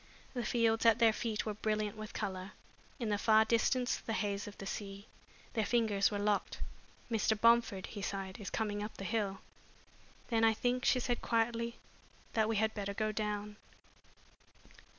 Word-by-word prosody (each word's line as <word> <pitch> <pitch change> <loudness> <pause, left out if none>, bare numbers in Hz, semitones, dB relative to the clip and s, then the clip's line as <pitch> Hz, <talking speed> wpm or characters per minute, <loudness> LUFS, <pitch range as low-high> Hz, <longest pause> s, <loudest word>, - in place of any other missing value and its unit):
The 245 -2 -2
fields 225 0 +2
at 225 - +6
their 225 -1 +5
feet 220 -1 -2
were 215 - -2
brilliant 215 0 -1
with 215 0 -7
color; 190 0 -4 0.4
in 235 -5 -2
the 205 -1 +1
far 220 0 +5
distance 245 +2 +2
the 225 - -4
haze 205 -2 -1
of 205 - -9
the 195 - -7
sea. 200 0 -5 0.5
Their 220 - +1
fingers 215 -3 +2
were 205 - -2
locked. 205 0 0 0.5
"Mr. 220 -1 +2
Bomford," 230 -4 +4
he 205 - -7
sighed, 195 +1 -4
"is 200 - -5
coming 205 -2 -2
up 210 +1 -6
the - - -6
hill." 195 0 -1 0.9
"Then 225 -2 +2
I 225 -1 +5
think," 250 +2 0
she 255 - +4
said 245 -1 -1
quietly, 230 0 0 0.6
"that 220 -1 +2
we 225 - +1
had 220 +1 +2
better 200 -1 -4
go 215 0 0
down!" 210 -1 -3
215 Hz, 170 wpm, -34 LUFS, 205-230 Hz, 0.9 s, at